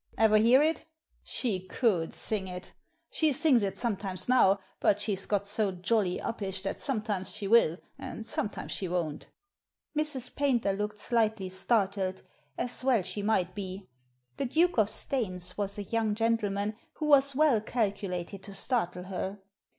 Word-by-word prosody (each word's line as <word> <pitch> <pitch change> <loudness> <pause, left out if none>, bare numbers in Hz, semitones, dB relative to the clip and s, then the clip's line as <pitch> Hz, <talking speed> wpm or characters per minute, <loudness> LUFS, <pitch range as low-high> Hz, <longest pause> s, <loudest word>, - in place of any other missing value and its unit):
Ever 220 -1 +5
hear 240 +6 +6
it? 320 +1 0 0.3
She 220 -7 -1
could 185 -2 0
sing 205 -3 -2
it! 180 0 -8 0.4
She 315 -2 +3
sings 280 -3 +4
it 195 -2 -2
sometimes 195 -5 -3
now, 200 -6 +5 0.2
but 205 - +3
she's 200 -2 -1
got 200 -1 0
so 205 0 0
jolly 185 +1 0
uppish 195 -4 -3
that 195 - -3
sometimes 215 -7 -2
she 200 - -4
will 200 -7 +5 0.2
and 220 - -6
sometimes 210 -2 -3
she 190 - -2
won't" 170 -4 -3 0.7
Mrs. 300 -5 -2
Paynter 245 -8 +2
looked 210 +1 -3
slightly 220 -3 0
startled, 190 -1 0 0.3
as 245 +1 0
well 250 -7 +3
she 205 - -4
might 190 -4 +1
be. 190 -1 -6 0.5
The - - -1
Duke 325 +3 +2
of 215 -1 +4
Staines 185 -9 -1
was 200 0 -1
a 205 - -3
young 220 0 0
gentleman 210 -2 0 0.2
who 310 - -4
was 280 -2 +5
well 290 -7 +4
calculated 200 -4 -2
to 200 0 -8
startle 180 -6 -1
her. 190 +1 -4
210 Hz, 155 wpm, -29 LUFS, 190-235 Hz, 0.7 s, hear